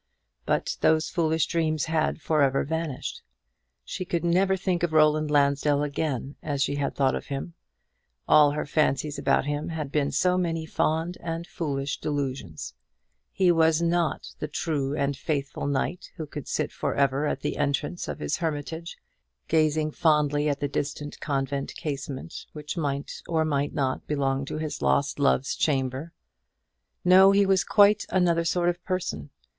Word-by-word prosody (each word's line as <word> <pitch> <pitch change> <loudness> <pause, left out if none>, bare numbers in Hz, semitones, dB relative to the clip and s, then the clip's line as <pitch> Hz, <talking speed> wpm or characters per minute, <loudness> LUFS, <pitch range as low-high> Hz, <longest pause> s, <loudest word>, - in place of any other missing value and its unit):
But - - 0
those 160 0 +3
foolish 160 -2 +1
dreams 155 -2 0
had 160 0 0
for 155 -1 +1
ever 135 -1 +3
vanished. 160 -2 -4 0.6
She 185 - -4
could 175 -1 -2
never 190 +3 +3
think 185 -2 -1
of 170 -2 0
Roland 155 0 +4
Lansdell 145 0 +2
again 140 -2 -3
as 140 -2 -1
she 145 - -1
had 140 - -2
thought 135 -2 +2
of - - -4
him. 140 +4 -5 0.7
All 150 -1 +7
her 150 - -2
fancies 145 0 0
about - - +2
him 145 +1 -2
had 155 -4 -4
been 145 -1 +1
so 180 +6 +2
many 165 -2 -1
fond 160 +3 -1
and 165 0 -4
foolish 140 -5 -3
delusions. 135 - -4 0.6
He 185 -2 +3
was 160 -1 +4
not 170 -1 0
the 150 - -3
true 145 -2 -2
and 140 0 0
faithful 140 -1 -3
knight 145 +5 -2
who 160 - -5
could 145 -1 -8
sit - - -1
for - - -2
ever 140 +1 +2
at - - -2
the - - -2
entrance 145 +5 -1
of - - -4
his - - -2
hermitage 160 +1 -4 0.5
gazing 155 -1 +2
fondly 150 -2 +2
at 140 -1 -1
the 145 - -1
distant 145 +1 -4
convent 140 -1 -2
casement, 140 0 -5
which 150 +1 -6
might 140 -4 -3
or 160 -2 +1
might 145 -2 -1
not 130 -2 -1
belong 135 -2 0
to 145 - -5
his 155 -1 -4
lost 140 +1 +1
love's 140 -1 +2
chamber. 135 +1 -1 0.9
No; 190 +2 +8
he 200 0 +4
was 190 -1 +3
quite 205 0 +4
another 175 -3 +2
sort 175 +1 +1
of 175 0 -1
person. 80 - -3
150 Hz, 160 wpm, -26 LUFS, 140-165 Hz, 0.9 s, No